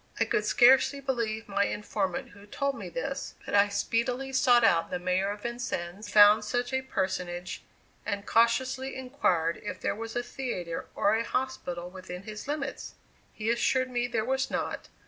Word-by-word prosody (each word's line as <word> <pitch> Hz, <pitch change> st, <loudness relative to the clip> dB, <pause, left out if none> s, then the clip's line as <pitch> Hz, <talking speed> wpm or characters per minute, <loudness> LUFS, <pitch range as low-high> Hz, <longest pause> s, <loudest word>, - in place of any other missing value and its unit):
I 225 Hz, -, +3 dB
could 215 Hz, -1 st, 0 dB
scarcely 265 Hz, +5 st, +5 dB
believe 230 Hz, -5 st, -2 dB
my 200 Hz, 0 st, +1 dB
informant 200 Hz, -3 st, -2 dB
who 200 Hz, +1 st, -16 dB
told 280 Hz, +6 st, -1 dB
me -, -, -7 dB
this, -, -, -4 dB
but -, -, -6 dB
I 205 Hz, 0 st, +5 dB
speedily 250 Hz, +6 st, -1 dB
sought 245 Hz, -3 st, +5 dB
out 170 Hz, -7 st, +4 dB
the 180 Hz, -, -2 dB
Mayor 185 Hz, +2 st, 0 dB
of 205 Hz, 0 st, -6 dB
Vincennes, 210 Hz, -5 st, -4 dB
found 210 Hz, 0 st, +7 dB
such 245 Hz, +4 st, -2 dB
a 260 Hz, -, +1 dB
personage, 180 Hz, -6 st, -3 dB, 0.4 s
and 200 Hz, 0 st, -3 dB
cautiously 260 Hz, +3 st, +2 dB
inquired 185 Hz, -, 0 dB
if 185 Hz, -3 st, -5 dB
there -, -, -1 dB
was 225 Hz, +1 st, -7 dB
a 240 Hz, -, 0 dB
theatre 185 Hz, -11 st, -4 dB
or 205 Hz, -, +3 dB
a 225 Hz, +1 st, +1 dB
hospital 230 Hz, -10 st, -3 dB
within 185 Hz, -1 st, -8 dB
his 215 Hz, +3 st, -8 dB
limits? 285 Hz, -2 st, -4 dB, 0.4 s
He 220 Hz, +1 st, -1 dB
assured 255 Hz, +2 st, +1 dB
me 245 Hz, 0 st, 0 dB
there 225 Hz, -3 st, -1 dB
was 265 Hz, +1 st, 0 dB
not. -, -, -3 dB
220 Hz, 170 wpm, -29 LUFS, 195-255 Hz, 0.4 s, found